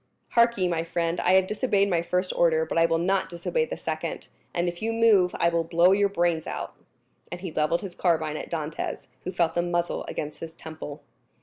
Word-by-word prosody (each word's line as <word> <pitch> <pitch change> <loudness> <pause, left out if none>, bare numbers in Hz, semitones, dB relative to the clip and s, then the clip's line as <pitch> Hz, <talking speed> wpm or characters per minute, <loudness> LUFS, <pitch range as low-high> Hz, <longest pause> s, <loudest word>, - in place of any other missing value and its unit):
Hark 235 -1 +4
ye, 185 -2 +2
my 165 -2 0
friend, 170 0 -1
I 180 - +3
have 190 0 +5
disobeyed 205 -1 +1
my 175 -4 +1
first 180 +2 -1
order, 160 -2 +3
but 165 - 0
I 165 - +5
will 165 0 +1
not 190 +2 +1
disobey 185 - -1
the - - -6
second; - - -4 0.2
and 175 +1 -1
if 175 0 -4
you 225 +1 0
move, 220 -6 +4
I 170 - +4
will 170 0 +1
blow 170 +2 +4
your 200 +1 +3
brains 170 -4 0
out." - - -5 0.6
And 175 0 -6
he 185 -3 -5
levelled 155 +2 +1
his 190 -3 -6
carbine 160 -4 +1
at - - -6
Dantès, 155 -2 -4 0.2
who 185 - -2
felt 170 -3 +1
the 175 - +1
muzzle 175 0 -1
against 150 0 -5
his 165 0 -8
temple. 155 -3 -8
175 Hz, 215 wpm, -26 LUFS, 165-190 Hz, 0.6 s, have